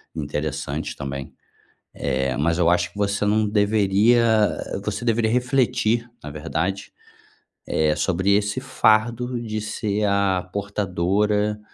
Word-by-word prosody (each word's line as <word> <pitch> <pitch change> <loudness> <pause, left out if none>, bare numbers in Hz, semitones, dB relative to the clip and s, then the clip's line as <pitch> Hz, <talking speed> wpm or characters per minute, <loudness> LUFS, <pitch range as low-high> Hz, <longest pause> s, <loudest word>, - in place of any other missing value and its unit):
interessante 75 -1 -3
também. 70 0 -6 0.6
Eh, 65 -1 -1
mas 85 +3 +1
eu 85 -2 +3
acho 85 0 +1
que 100 - -12
você 100 0 0
não 105 +1 +2
deveria 105 +2 +3 0.5
eh, - - -3
você - - -3
deveria 115 -1 +1
refletir, 125 -2 +1
na 75 - -7
verdade, 85 +6 -3 0.8
eh, 75 -1 +1
sobre 95 +5 0
esse 105 0 0
fardo 120 +3 +1
de 110 -2 -4
ser 105 -1 -2
a 100 -2 +1
portadora 100 +2 0
100 Hz, 125 wpm, -23 LUFS, 85-110 Hz, 0.8 s, eu